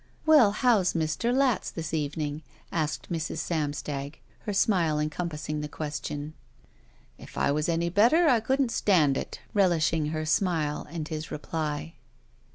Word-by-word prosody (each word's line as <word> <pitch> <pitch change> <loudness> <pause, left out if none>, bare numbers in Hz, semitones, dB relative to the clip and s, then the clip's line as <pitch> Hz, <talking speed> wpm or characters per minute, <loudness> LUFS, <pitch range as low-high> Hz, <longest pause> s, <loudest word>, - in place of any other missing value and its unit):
"Well, 300 -9 +7
how's 210 -5 +3
Mr. 160 +8 0
Latz 260 -4 +2
this 160 -2 -6
evening?" 150 0 -2 0.3
asked 155 0 -2
Mrs. 165 -1 -3
Samstag, 145 -3 -3 0.3
her - - 0
smile 180 -6 +2
encompassing 150 -1 -3
the 150 - -4
question. 150 0 -5 0.9
K - - -11
I - - +1
was 150 +3 0
any 170 +1 +1
better 240 - +4
I 250 -6 +5
couldn't 260 +2 0
stand 160 -12 +3
it," - - -5
relishing 165 -6 +2
her 155 0 -3
smile 155 -2 0
and 160 -1 -5
his 155 -1 -5
reply. 155 0 -4
160 Hz, 140 wpm, -27 LUFS, 150-195 Hz, 0.9 s, Well